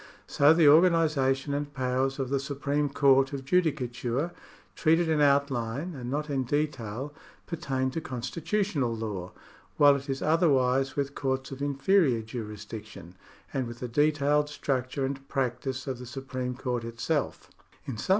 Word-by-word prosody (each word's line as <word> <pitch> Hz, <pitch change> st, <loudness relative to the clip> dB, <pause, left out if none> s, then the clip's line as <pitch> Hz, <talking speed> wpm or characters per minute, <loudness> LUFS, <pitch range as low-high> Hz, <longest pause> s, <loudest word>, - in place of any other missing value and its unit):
So 145 Hz, +2 st, +4 dB
the 165 Hz, -1 st, +5 dB
organisation 150 Hz, -4 st, +4 dB
and 145 Hz, 0 st, -2 dB
powers 130 Hz, +1 st, 0 dB
of 135 Hz, -3 st, -2 dB
the 140 Hz, -, +2 dB
Supreme 140 Hz, +1 st, -1 dB
Court 135 Hz, -1 st, +4 dB
of 135 Hz, -1 st, -5 dB
Judicature, 140 Hz, -3 st, 0 dB, 0.4 s
treated 165 Hz, +1 st, +3 dB
in 155 Hz, -2 st, +2 dB
outline 140 Hz, +2 st, +1 dB
and 125 Hz, -4 st, -6 dB
not 150 Hz, +3 st, -2 dB
in 135 Hz, -3 st, -1 dB
detail, 135 Hz, -2 st, -2 dB, 0.3 s
pertain 135 Hz, -6 st, -2 dB
to 165 Hz, -, -3 dB
constitutional 145 Hz, -, -2 dB
law; 105 Hz, -5 st, -5 dB, 0.5 s
while 145 Hz, -1 st, +7 dB
it 140 Hz, +1 st, -6 dB
is 135 Hz, 0 st, -2 dB
otherwise 135 Hz, -5 st, +2 dB
with 140 Hz, -1 st, -2 dB
courts 135 Hz, -1 st, -2 dB
of 135 Hz, +1 st, -7 dB
inferior 140 Hz, -, +2 dB
jurisdiction, 105 Hz, -4 st, -8 dB, 0.4 s
and 130 Hz, -2 st, -1 dB
with 120 Hz, 0 st, -8 dB
the 125 Hz, -, -4 dB
detailed 150 Hz, +3 st, +2 dB
structure 135 Hz, -1 st, -2 dB
and 135 Hz, 0 st, -5 dB
practice 130 Hz, 0 st, -2 dB
of 130 Hz, -3 st, -4 dB
the 125 Hz, -, -8 dB
Supreme 130 Hz, 0 st, -4 dB
Coin't 125 Hz, -3 st, -2 dB
itself. 115 Hz, +6 st, -3 dB, 0.3 s
In 120 Hz, -6 st, -5 dB
some -, -, -6 dB
135 Hz, 150 wpm, -28 LUFS, 125-145 Hz, 0.5 s, while